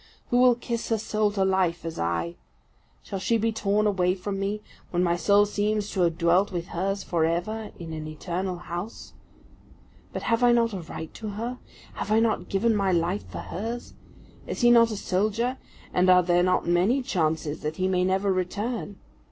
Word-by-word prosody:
Who 245 - +4
will 250 -1 +6
kiss 235 -1 -4
her 225 - +2
soul 215 -1 0
to 195 -2 +1
life 185 -3 +1
as 165 - -5
I? 85 0 -1 0.7
Shall 195 - -5
she 230 +4 +2
be 225 +1 +1
torn 210 -1 +1
away 185 -3 +2
from 195 +1 -4
me, 205 +2 -2 0.3
when 175 0 +1
my 170 -1 +2
soul 200 +4 +4
seems 210 0 -1
to 190 - -1
have 170 -2 +2
dwelt 175 +4 +3
with 175 -2 -4
hers 195 +3 -2
for 170 -2 0
ever 195 +7 -1
in 165 -2 -7
an 155 -1 -5
eternal 180 +4 -3
house? 175 +5 -7 1.0
But - - -5
have 230 0 +1
I 245 -1 +6
not 230 -2 +2
a 190 - -4
right 160 -1 -8
to 220 -2 -6
her? 230 +5 -4 0.3
Have 210 - -4
I 220 - +5
not 225 -1 0
given 220 +3 +2
my 195 -2 +2
life 175 +3 0
for - - -6
hers? 230 +6 -4 0.5
Is - - -4
he 240 0 +6
not 230 -1 +6
a 215 - -4
soldier, 215 +8 0 0.3
and 180 +1 +3
are 180 0 +7
there 175 0 +3
not 185 +1 +2
many 190 +10 +2
chances 160 - -1
that 150 +1 -3
he 185 +2 0
may 180 -1 +2
never 190 +1 +1
return? 205 +3 -3
195 Hz, 195 wpm, -26 LUFS, 175-220 Hz, 1.0 s, are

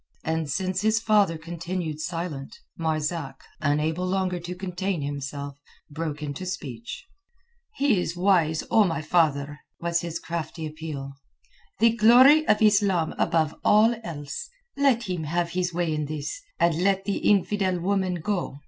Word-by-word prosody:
And 160 -2 -1
since 185 +6 -1
his 220 +1 +3
father 210 -7 +3
continued 165 -1 -4
silent, 165 -4 -5 0.2
Marzak, 160 -1 -2 0.2
unable 155 +4 0
longer 185 -1 0
to 175 +1 -6
contain 185 -2 -3
himself, 140 0 -5 0.3
broke 155 0 -4
into 145 +4 -5
speech. 150 - -6 0.7
"He 275 -9 +2
is 175 -1 -3
wise, 175 -4 +2
O 220 - +6
my 165 -5 -1
father!" 145 -4 +1 0.2
was 170 0 0
his 170 -1 -4
crafty 165 -1 -5
appeal. 150 -3 -6 0.6
"The 230 +1 +5
glory 255 +7 +7
of 210 +1 +3
Islam 200 -6 +3
above 160 -2 +2
all 220 +3 +5
else! 165 - -6 0.3
Let 275 -4 +3
him 180 -6 -3
have 170 +2 -1
his 180 0 -1
way 170 -2 -1
in 150 -1 -1
this, 155 - -5 0.2
and 170 -1 +2
let 195 0 +2
the 200 - -1
infidel 195 -2 +2
woman 190 0 0
go. 175 -4 -2
170 Hz, 145 wpm, -25 LUFS, 155-195 Hz, 0.7 s, glory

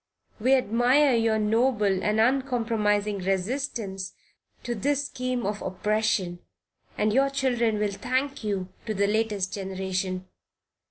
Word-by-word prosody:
We 255 +5 +4
admire 255 +4 +3
your 225 -1 +2
noble 215 -3 +2
and 215 +1 +1
uncompromising 225 -5 +1
resistance 195 0 -2 0.5
to 240 - -2
this 285 +5 0
scheme 255 -3 -3
of 205 +1 -2
oppression, 190 -2 0 0.6
and 210 0 +1
your 275 +3 +4
children 245 -5 +1
will 210 -1 0
thank 260 +7 -2
you 195 -3 -2 0.2
to 215 - -1
the 200 +1 +2
latest 210 -2 0
generation. 190 -1 -3
215 Hz, 120 wpm, -26 LUFS, 195-250 Hz, 0.6 s, We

